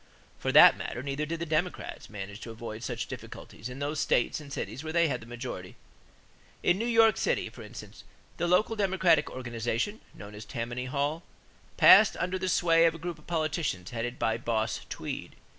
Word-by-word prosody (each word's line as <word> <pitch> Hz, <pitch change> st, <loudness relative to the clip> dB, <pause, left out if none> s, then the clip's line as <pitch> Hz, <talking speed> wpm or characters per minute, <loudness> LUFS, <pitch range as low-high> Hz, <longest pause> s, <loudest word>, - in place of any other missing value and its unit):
For -, -, -1 dB
that -, -, +9 dB
matter 120 Hz, -, -5 dB
neither 140 Hz, +2 st, -3 dB
did 165 Hz, +1 st, -3 dB
the 170 Hz, -, -2 dB
Democrats 165 Hz, +3 st, -2 dB
manage 100 Hz, 0 st, -7 dB
to 120 Hz, -, -8 dB
avoid 115 Hz, -1 st, -7 dB
such 120 Hz, -1 st, -3 dB
difficulties 115 Hz, -1 st, -9 dB
in 125 Hz, -, -8 dB
those 145 Hz, +2 st, -2 dB
states 120 Hz, -, +1 dB
and 145 Hz, -2 st, -11 dB
cities 140 Hz, +1 st, -5 dB
where 160 Hz, -, -4 dB
they 170 Hz, 0 st, +3 dB
had 125 Hz, -5 st, -2 dB
the 110 Hz, -, -12 dB
majority. 120 Hz, -6 st, -7 dB, 0.9 s
In 175 Hz, +2 st, +3 dB
New 230 Hz, -, -1 dB
York 225 Hz, -2 st, +5 dB
City, -, -, 0 dB
for -, -, -12 dB
instance, -, -, -11 dB, 0.3 s
the 175 Hz, -, 0 dB
local 195 Hz, +6 st, +3 dB
Democratic 185 Hz, -6 st, +3 dB
organization, 120 Hz, -, -3 dB
known 100 Hz, 0 st, -10 dB
as 105 Hz, +1 st, -8 dB
Tammany 120 Hz, +3 st, -4 dB
Hall, 145 Hz, +5 st, -1 dB, 0.6 s
passed 215 Hz, -, +8 dB
under 185 Hz, +2 st, -2 dB
the 185 Hz, 0 st, -1 dB
sway 170 Hz, -2 st, +4 dB
of 165 Hz, 0 st, +3 dB
a -, -, -6 dB
group 170 Hz, 0 st, -6 dB
of 155 Hz, -, -21 dB
politicians 155 Hz, -, -2 dB
headed 120 Hz, +1 st, -3 dB
by 115 Hz, 0 st, 0 dB
"Boss" 110 Hz, -2 st, -1 dB
Tweed. -, -, -6 dB
145 Hz, 190 wpm, -29 LUFS, 115-170 Hz, 0.9 s, that